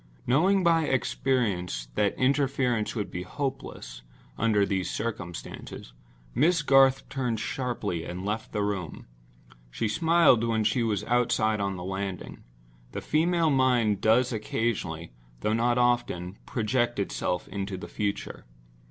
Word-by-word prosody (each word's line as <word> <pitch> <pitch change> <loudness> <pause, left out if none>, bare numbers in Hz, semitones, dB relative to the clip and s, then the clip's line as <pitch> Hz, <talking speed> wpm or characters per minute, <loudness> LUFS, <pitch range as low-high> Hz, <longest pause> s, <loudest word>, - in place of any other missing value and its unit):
Knowing 185 +8 +3
by 165 -2 +4
experience 105 - 0
that 100 +8 +1
interference 130 -4 +1
would 105 -3 -3
be 90 - -4
hopeless, 95 - -5 0.3
under 105 -3 +2
these 95 -2 -1
circumstances, 90 - -6 0.4
Miss 160 +4 +3
Garth 135 -1 +5
turned 125 -5 -2
sharply 115 - -3
and 90 +3 -6
left 110 +2 -3
the 105 - -1
room. 100 -5 -4 0.6
She - - -2
smiled 160 -1 +4
when 115 -2 +1
she 110 +4 +1
was 110 -4 0
outside 115 -3 +1
on 100 -1 -1
the 90 - -6
landing. 95 0 -5 0.5
The - - -4
female 165 +1 +2
mind 120 -7 +2
does 120 +4 +3
occasionally—though 85 - -3
not 120 +2 +2
often—project 120 +1 0
itself 90 -2 -2
into 100 -1 -4
the 95 - -8
future. 100 -2 -4
110 Hz, 125 wpm, -27 LUFS, 95-130 Hz, 0.6 s, Garth